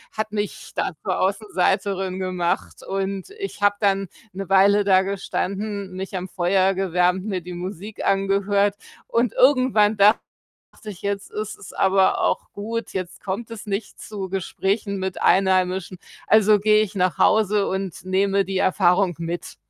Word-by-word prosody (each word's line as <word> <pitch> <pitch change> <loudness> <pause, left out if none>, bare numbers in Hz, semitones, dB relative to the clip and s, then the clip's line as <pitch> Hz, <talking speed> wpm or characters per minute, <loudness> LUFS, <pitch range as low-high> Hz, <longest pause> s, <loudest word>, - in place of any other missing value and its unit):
hat 215 0 -3
mich 205 -2 -4
da - - -1
zur 185 -3 -1
Außenseiterin 195 -1 0
gemacht 180 -2 -2
und 195 - -3
ich 395 - -6
habe 205 0 +4
dann 195 -2 +1 0.3
'ne 195 -1 -6
Weile 200 +1 +5
da 190 -1 +4
gestanden, 200 +1 -3
mich 190 +1 -6
am 185 0 -5
Feuer 190 +1 +2
gewärmt, 180 0 +1
mir 190 -4 -2
die 180 +1 -8
Musik 190 +4 -7
angehört 200 +1 +2 0.3
und 235 -1 +1
irgendwann 255 -6 +4
dachte 205 +2 +6 0.7
ich: 205 -4 -8
„Jetzt 200 -1 -3
ist 215 0 -5
es - - -11
aber 190 0 +3
auch - - 0
gut. 225 +2 -4
Jetzt 185 -2 -5
kommt 220 +4 -5
es 225 -1 -8
nicht 200 0 -4
zu 195 -3 -6
Gesprächen 195 +2 -2
mit 190 -1 -4
Einheimischen, 185 0 +2 0.3
also, 215 -1 +5
gehe 215 +1 +4
ich 215 -1 -3
nach 185 -2 +1
Hause 210 -2 +3
und 190 -2 -4
nehme 195 +1 +1
die 190 0 -3
Erfahrung 185 -1 +3
mit.“ 170 +1 -5
195 Hz, 150 wpm, -22 LUFS, 185-205 Hz, 0.7 s, dachte